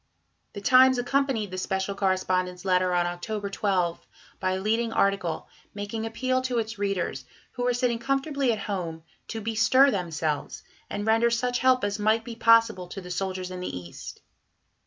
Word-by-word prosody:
The 200 - -7
Times 255 +4 +6
accompanied 245 -5 0
the 185 - -4
"Special 190 +1 -2
Correspondent's" 185 -1 -1
letter 185 -1 +2
on 175 0 +2
October 200 +4 -4
12 185 -4 -1 0.3
by 185 -1 0
a 190 - -2
leading 225 +3 0
article, 195 -6 0 0.3
making 210 +2 -4
appeal 255 +3 0
to 255 -2 -2
its 225 -1 -3
readers, 190 -9 -2 0.3
who 250 - -6
were 245 - +2
sitting 245 -2 0
comfortably 275 +1 0
at 220 - -1
home, 170 -5 -4 0.2
to 225 - -5
bestir 230 +5 +4
themselves, 160 -6 -3 0.3
and 205 - -3
render 225 +1 +4
such 245 +1 0
help 255 -1 +3
as 205 +1 -1
might 215 +2 +2
be 230 0 -7
possible 230 -5 +4
to 185 - -7
the 180 -1 -9
soldiers 185 0 -3
in 180 - -6
the 180 - -4
East. 85 -1 -9
205 Hz, 170 wpm, -26 LUFS, 185-235 Hz, 0.3 s, Times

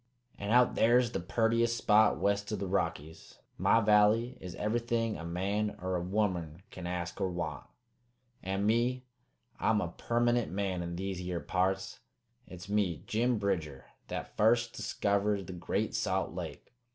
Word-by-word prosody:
"An' 100 - -4
out 125 +2 +5
there's 120 +1 +4
the - - -2
purtiest 115 +5 +1
spot 110 0 +4
west 100 +1 0
o' - - 0
the 100 - -3
Rockies, 80 -4 -3 0.2
My 115 - +4
valley 105 +3 +4
is 90 -2 -7
ever'thing 115 +1 -1
a - - -7
man 100 +5 -2
er 95 +1 -2
a 90 - -1
womern 90 -3 -1
can 90 -1 -7
ask 90 +1 -4
or 95 - +1
want. 85 -1 -4 0.8
And 95 +2 -2
me, 120 +4 +1 0.5
I'm 110 -1 +2
a 90 - -2
permanent 120 0 +1
man 95 -2 -1
in 85 0 -4
these 95 0 -4
yere 90 -1 -3
parts. 95 +4 -1 0.5
It's 90 0 -10
me, 100 -6 0
Jim 120 +2 +1
Bridger, 80 -10 -2 0.2
that - - -6
fust 115 +2 +3
diskivered 100 -1 0
the 95 - -7
Great 90 - -2
Salt - - -1
Lake. - - -7
100 Hz, 155 wpm, -31 LUFS, 90-115 Hz, 0.8 s, out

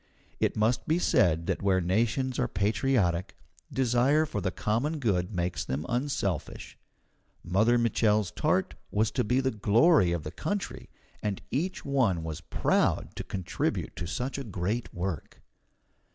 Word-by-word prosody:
It - - +1
must 110 +2 +1
be 160 - +3
said 85 - +3
that - - -1
where 95 -2 +3
nations 115 +8 0
are 125 - +2
patriotic, 100 -4 0 0.3
desire 130 +4 +3
for 125 -10 -4
the 95 - 0
common 120 - -1
good 95 -9 0
makes 85 -3 -1
them 70 +5 -3
unselfish. 120 - -2 0.7
Mother 110 +8 +3
Mitchel's 110 -4 +2
tart - - 0 0.2
was 110 +1 +1
to - - 0
be 125 +5 +2
the 130 0 0
glory 110 - +4
of 85 -3 -2
the - - -5
country, 190 - -4 0.3
and 100 -2 -2
each 170 +9 -2
one 115 -12 +1
was 80 0 -5
proud 80 - 0
to - - -4
contribute 95 -3 -3
to 85 - -4
such 125 +11 -3
a - - -4
great 105 +2 -3
work. 90 -4 -5
105 Hz, 150 wpm, -28 LUFS, 90-130 Hz, 0.7 s, glory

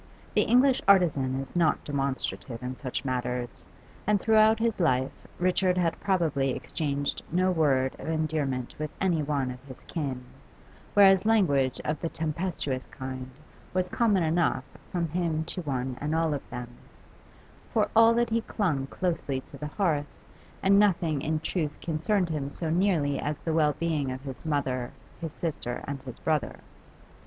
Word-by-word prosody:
The - - +4
English 255 +2 +4
artisan 145 -9 +4
is 135 +3 -7
not 170 -3 +2
demonstrative 135 -3 -3
in 125 +1 -4
such 130 0 -4
matters, 125 -1 -3 0.4
and 210 -1 +4
throughout 220 +1 +5
his 225 -2 0
life 130 -6 0
Richard 180 0 +2
had 170 -2 +1
probably 155 -9 +1
exchanged 145 -3 -2
no 185 +2 +3
word 135 -6 +2
of - - -7
endearment 155 -6 -1
with 155 0 -2
any 175 -5 +2
one 140 -3 -1
of 125 0 -9
his 130 -2 -12
kin, 135 -6 -4 0.7
whereas 195 -2 +7
language 145 - +3
of 150 -1 -1
the 165 - -1
tempestuous 155 -5 -3
kind 130 -1 -6 0.5
was 185 -1 +1
common 210 -6 +2
enough 160 -4 +1 0.3
from 170 -2 0
him 165 -1 0
to 180 +2 -3
one 130 -4 -2
and 150 +2 -1
all 165 -1 +2
of 140 - -5
them; 125 -1 -6 1.0
for - - +2
all 225 +1 +7
that 240 -1 +1
he 230 +1 +2
clung 160 -13 -1
closely 155 -6 -2
to 140 - -13
the 150 - -4
hearth, 150 -4 0 0.6
and 200 +1 +6
nothing 170 -8 +2
in 155 +2 0
truth 155 -2 -2
concerned 175 +3 0
him 145 -3 -2
so 160 +2 -3
nearly 165 -6 +2
as 145 0 -2
the 165 - 0
well 150 -2 +3
being 155 -5 0
of 130 +1 -5
his 135 -2 -8
mother, 130 -5 -1 0.3
his 165 -2 -4
sister, 145 -7 -4
and 140 -1 -4
his 130 -3 -9
brother. 155 -2 -1
155 Hz, 160 wpm, -28 LUFS, 135-180 Hz, 1.0 s, whereas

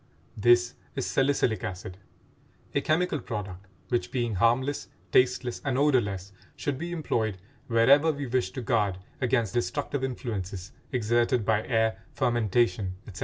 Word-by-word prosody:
This 120 +2 +4 0.2
is 135 - -1
salicylic 135 -6 +1
acid, 90 0 -6 0.7
a 140 - +2
chemical 155 0 +1
product 95 -5 -6 0.2
which, 120 -1 0
being 120 -3 -1
harmless, 120 +8 +1 0.2
tasteless, 125 -1 +2
and 130 -3 0
odorless, 100 -10 +1 0.2
should 140 -2 -3
be 170 +2 -4
employed 115 - -1 0.3
wherever 135 +7 +5
we 145 -2 -4
wish 125 0 0
to 130 - -5
guard 100 -4 +1 0.2
against 120 -4 +1
destructive 120 +4 -1
influences 100 -7 -4 0.2
exerted 120 -1 +1
by 110 0 +1
air, 110 -2 +1
fermentation, 115 -4 +1
etc. 95 -4 -9
120 Hz, 130 wpm, -27 LUFS, 105-130 Hz, 0.7 s, wherever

